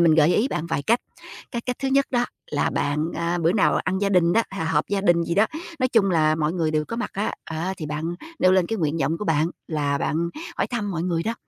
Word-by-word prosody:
mình 165 -2 +5
gợi 160 +2 +5
ý 235 +6 +2
bạn 165 - -3
vài 145 - -1
cách. 235 +10 +2 0.5
Cái 235 - -3
cách 250 -1 -3
thứ 270 - -1
nhất 275 +1 +3
đó 245 -1 +2 0.3
là 145 - +1
bạn, 150 +2 0
à, 170 +1 -1
bữa 165 0 +2
nào 200 - +3
ăn 190 +1 0
gia 200 0 +1
đình 175 -3 +3
đó, 230 - +4
h 195 - -8
họp 150 -1 +1
gia 200 0 0
đình 175 -3 +3
gì 170 - -2
đó, 205 +4 +4 0.3
nói 255 - +2
chung 220 -6 +3
là 155 -3 +3
mọi 155 0 0
người 165 -3 0
đều 155 -1 0
có 230 - -4
mặt 240 - -3
á, 205 +2 -1
á, 165 +4 -3
thì 155 - -5
bạn 155 +3 -3 0.2
nêu 185 - +5
lên 185 -2 +3
cái 225 - -2
nguyện 155 -2 0
vọng 155 +4 0
của - - -4
bạn 160 -2 +2 0.2
là 145 -3 0
bạn 165 +4 0 0.3
hỏi - - +1
thăm 215 -5 -3
mọi 165 -3 -2
người 170 -2 0
đó, 225 +4 -2
170 Hz, 270 wpm, -24 LUFS, 155-205 Hz, 0.5 s, mình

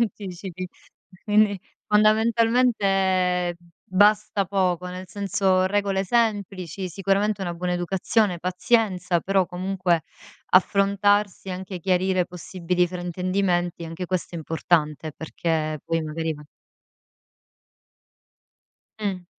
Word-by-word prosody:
anticipi. 185 -4 -4 0.6
Quindi, 210 -1 +3 0.3
fondamentalmente 210 -5 +2 0.3
basta 205 +1 +3
poco 180 -2 0
nel 180 +1 -7
senso 190 -1 +1
regole 195 -1 0
semplici, 195 -5 -1
sicuramente 195 +3 0
una 175 -2 -3
buona 180 +1 -2
educazione, 180 +2 0
pazienza, 180 -1 +1
però 190 -1 +1
comunque 180 -2 0 0.5
affrontarsi, 200 +1 +2
anche 185 0 -5
chiarire 185 0 +1
possibili 180 0 -1
fraintendimenti, 175 0 -1
anche 165 +3 -6
questo 180 -1 -3
è - - -3
importante, 155 -1 0
perché 160 -1 -2
poi 165 0 -1
magari 160 +1 -3
va 150 0 -12 2.6
Mh. 190 -4 -3
185 Hz, 95 wpm, -24 LUFS, 175-200 Hz, 2.6 s, Quindi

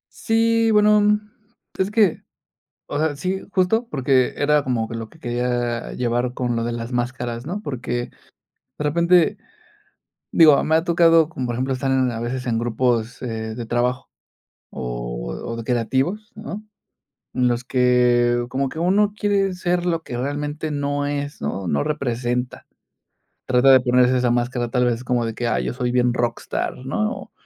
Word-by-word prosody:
Sí, 230 0 +2
bueno, 210 -1 +4 0.6
es 190 +1 +1
que 210 -5 +2 0.7
o - - -5
sea, 155 -2 0
sí, 185 +5 -2
justo, 220 +6 +1
porque 130 -2 +2
era 150 0 +2
como 120 -4 -1
que - - -7
lo 115 -1 -5
que 165 - -20
quería 120 -2 -2
llevar 120 0 -1
con 125 -1 -2
lo 115 - -1
de 120 - -2
las 120 +1 -5
máscaras, 120 -1 -3
¿no?, 180 +7 -4
porque 120 - -4 0.7
de - - -3
repente, 170 +3 +3 1.0
digo, 155 -4 +6
me 160 - +1
ha 160 - +4
tocado, 165 -2 +4
como 130 -6 -4
por 120 - -2
ejemplo, 130 +3 -1
estar 135 +1 -1
en 130 -1 +2
a 115 - -5
veces 125 +2 -4
en 115 -2 0
grupos, 120 0 -1
eh, 110 -2 -4
de 120 +1 -5
trabajo 120 +2 -1 0.6
o - - -5
o 115 - -4
de 115 - -6
creativos, 135 - -1
¿no?, 215 -1 -7 0.7
en 125 -1 +1
los 120 0 +1
que 125 -1 +3
como 135 +2 -1
que 160 - -7
uno 200 +4 +3
quiere 200 -2 +1
ser 180 -1 -1
lo 165 -2 0
que 120 - -6
realmente 145 +3 -3
no 145 0 -1
es, 145 0 -4
¿no?, 90 +6 -3
no 70 -2 +1
representa, 125 -3 -2 0.8
trata 130 +1 +5
de 130 - +8
ponerse 125 0 +3
esa 125 -1 +1
máscara 120 0 0
tal 125 +1 +1
vez 120 +1 -2
como 120 -1 0
de 115 - -3
que, 120 - -2
ah, - - +1
yo - - -3
soy 125 -1 -2
bien 125 -1 +2
rockstar, 120 -1 -2
¿no?, 215 +11 -1
o, - - -10
125 Hz, 175 wpm, -22 LUFS, 120-160 Hz, 1.0 s, de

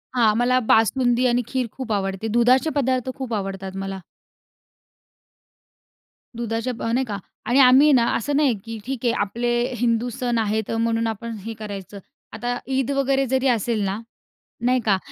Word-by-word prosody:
हां, 225 -4 +4
मला 250 +1 +3
बासुंदी 245 +3 +3
आणि 245 0 +2
खीर 255 -2 -1
खूप 260 -4 -6
आवडते. 195 +1 -2
दुधाचे 255 +5 +4
पदार्थ 260 -2 0
खूप 260 -3 -4
आवडतात 195 -2 -4
मला. 195 0 -5 2.4
दुधाच्या 230 +1 -2
प - - -5
नाही 260 +2 +1
का? 205 -3 -4 0.3
आणि 245 +5 +3
आम्ही 270 +3 +7
ना 235 -3 +4
असं 280 +5 -1
नाहीये, 285 -4 +3
की 225 -1 -6
ठीक 265 -2 -3
आहे 235 - +4
आपले 235 +4 -1 0.3
हिंदू 235 0 +1
सण 245 -2 0
आहेत 220 -1 -1
अ, 225 - -1
म्हणून 230 0 0
आपण 225 +1 -4
हे 225 - -4
करायचं. 200 -2 -7 0.3
आता 245 0 -3 0.2
ईद 270 +1 0
वगैरे 275 0 +1
जरी 265 +1 +1
असेल 230 -2 +1
ना, 195 +3 -2 0.7
नाही 255 +1 +3
का? 195 -3 +3
235 Hz, 165 wpm, -22 LUFS, 220-255 Hz, 2.4 s, आम्ही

